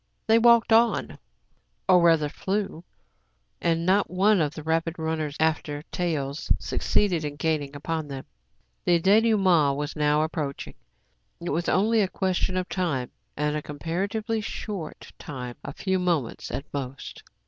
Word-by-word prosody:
They 225 Hz, +1 st, +5 dB
walked 235 Hz, -1 st, +5 dB
on, 230 Hz, +1 st, +2 dB, 0.7 s
or 180 Hz, -2 st, +6 dB
rather 165 Hz, -3 st, +4 dB
flew; 190 Hz, +2 st, -3 dB, 0.8 s
and 165 Hz, 0 st, +1 dB
not 195 Hz, +3 st, +3 dB
one 195 Hz, +1 st, +3 dB
of 150 Hz, -1 st, -1 dB
the 155 Hz, -, -7 dB
rapid 165 Hz, +1 st, 0 dB
runners 160 Hz, -2 st, -2 dB
after 155 Hz, -2 st, 0 dB
taels 155 Hz, -5 st, -2 dB
succeeded 180 Hz, -6 st, 0 dB
in 145 Hz, -1 st, -4 dB
gaining 145 Hz, -2 st, -1 dB
upon 160 Hz, +1 st, -3 dB
them. 135 Hz, -2 st, -7 dB, 0.6 s
The 175 Hz, -1 st, +3 dB
dénoûme7it 190 Hz, -7 st, +4 dB
was 145 Hz, +1 st, -4 dB
now 150 Hz, 0 st, +2 dB
approaching. 155 Hz, -3 st, -4 dB, 0.7 s
It 170 Hz, -, -4 dB
was 165 Hz, +4 st, -1 dB
only 220 Hz, +4 st, +3 dB
a 195 Hz, -, +2 dB
question 185 Hz, 0 st, -1 dB
of 185 Hz, 0 st, -1 dB
time, 145 Hz, -10 st, -2 dB, 0.3 s
and 150 Hz, +1 st, 0 dB
a 150 Hz, -, -2 dB
comparatively 200 Hz, +10 st, -3 dB
short 205 Hz, -5 st, -6 dB
time, 125 Hz, -5 st, -7 dB
— -, -, -44 dB
a -, -, -5 dB
few 190 Hz, -1 st, -1 dB
moments 170 Hz, -10 st, -1 dB
at 140 Hz, -, -4 dB
most. 135 Hz, -1 st, -6 dB
165 Hz, 150 wpm, -26 LUFS, 150-190 Hz, 0.8 s, or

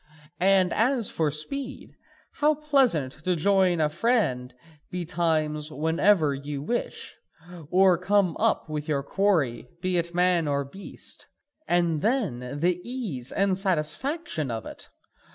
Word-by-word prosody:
And 190 Hz, -1 st, +4 dB
as 235 Hz, -1 st, +2 dB
for 160 Hz, -2 st, +1 dB
speed 260 Hz, -, -5 dB, 0.4 s
how 300 Hz, +1 st, +2 dB
pleasant 270 Hz, -, +2 dB
to 180 Hz, +1 st, +1 dB
join 185 Hz, 0 st, +3 dB
a 155 Hz, -, +3 dB
friend 155 Hz, -, 0 dB, 0.4 s
betimes 160 Hz, -3 st, -1 dB
whenever 160 Hz, +1 st, +2 dB
you 140 Hz, +1 st, -5 dB
wish, 240 Hz, +10 st, -3 dB, 0.5 s
or 185 Hz, -1 st, +4 dB
come 185 Hz, -2 st, +2 dB
up -, -, +1 dB
with 150 Hz, -1 st, -4 dB
your 140 Hz, -3 st, 0 dB
quarry 150 Hz, -, +1 dB
be 180 Hz, 0 st, 0 dB
it 170 Hz, 0 st, -4 dB
man 175 Hz, -2 st, +3 dB
or 140 Hz, -1 st, 0 dB
beast! 190 Hz, +9 st, -9 dB, 0.4 s
And 170 Hz, -3 st, +2 dB
then, 215 Hz, -, 0 dB, 0.2 s
the 180 Hz, +1 st, +1 dB
ease 210 Hz, -, -4 dB
and 195 Hz, -1 st, +2 dB
satisfaction 190 Hz, -, -1 dB
of 110 Hz, -2 st, -4 dB
it! -, -, -9 dB
175 Hz, 130 wpm, -26 LUFS, 150-200 Hz, 0.5 s, And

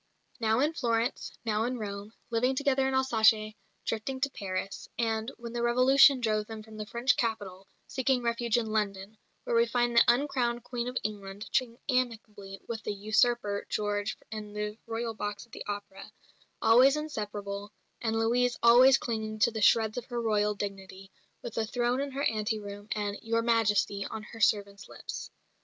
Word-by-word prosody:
Now 225 Hz, +1 st, +2 dB
in 300 Hz, +3 st, +2 dB
Florence, 235 Hz, -4 st, -1 dB
now 215 Hz, -1 st, +1 dB
in 250 Hz, +1 st, -2 dB
Rome; 205 Hz, -1 st, -6 dB, 0.2 s
living 250 Hz, +3 st, +2 dB
together 270 Hz, -1 st, +2 dB
in 265 Hz, -, 0 dB
Alsace, 220 Hz, -4 st, +3 dB, 0.3 s
drifting 225 Hz, +4 st, -3 dB
to 280 Hz, 0 st, 0 dB
Paris; 195 Hz, -2 st, -5 dB
and, 225 Hz, +1 st, -1 dB
when 235 Hz, -1 st, -8 dB
the 240 Hz, -, -2 dB
Revolution 260 Hz, +3 st, +6 dB
drove 215 Hz, -2 st, 0 dB
them 220 Hz, -1 st, -8 dB
from 220 Hz, 0 st, -12 dB
the 210 Hz, -1 st, -5 dB
French 240 Hz, +5 st, +1 dB
capital, 200 Hz, -5 st, -3 dB, 0.2 s
seeking 260 Hz, -1 st, 0 dB
refuge 235 Hz, 0 st, +1 dB
in 235 Hz, -, 0 dB
London, 205 Hz, -1 st, -2 dB, 0.2 s
where -, -, -1 dB
we 230 Hz, 0 st, +4 dB
find 240 Hz, 0 st, 0 dB
the 235 Hz, -, +8 dB
uncrowned 240 Hz, -2 st, +1 dB
Queen 245 Hz, -1 st, -4 dB
of 250 Hz, 0 st, -3 dB
England 200 Hz, -1 st, -5 dB
chatting 245 Hz, -3 st, 0 dB
amicably 220 Hz, -6 st, -2 dB
with 230 Hz, -2 st, -4 dB
the 210 Hz, -, -3 dB
"usurper" 215 Hz, 0 st, +1 dB
George 205 Hz, 0 st, -1 dB
in 210 Hz, -1 st, -6 dB
the 210 Hz, 0 st, -3 dB
Royal 230 Hz, 0 st, -3 dB
box 205 Hz, 0 st, -5 dB
at 235 Hz, -, -31 dB
the -, -, -7 dB
opera 205 Hz, -1 st, -6 dB, 0.5 s
always 260 Hz, +5 st, +6 dB
inseparable, 205 Hz, -8 st, -5 dB, 0.3 s
and 225 Hz, -1 st, 0 dB
Louise 240 Hz, +2 st, +2 dB
always 250 Hz, +3 st, +8 dB
clinging 220 Hz, -3 st, -3 dB
to 215 Hz, +2 st, +3 dB
the 220 Hz, -1 st, -4 dB
shreds 220 Hz, +2 st, +4 dB
of 240 Hz, -, -11 dB
her 240 Hz, -1 st, -4 dB
Royal 210 Hz, -2 st, +1 dB
dignity, 195 Hz, -1 st, -7 dB, 0.3 s
with 235 Hz, -, -6 dB
a 220 Hz, -, +1 dB
throne 245 Hz, +2 st, 0 dB
in 280 Hz, -, -2 dB
her 275 Hz, +1 st, -2 dB
ante 215 Hz, -1 st, 0 dB
room, 205 Hz, 0 st, -8 dB
and 205 Hz, -1 st, -3 dB
"Your 230 Hz, 0 st, 0 dB
Majesty" 210 Hz, -3 st, +2 dB
on 220 Hz, -, -6 dB
her 225 Hz, +1 st, -11 dB
servants' 200 Hz, -2 st, +1 dB
lips. -, -, -7 dB
225 Hz, 175 wpm, -29 LUFS, 210-240 Hz, 0.5 s, the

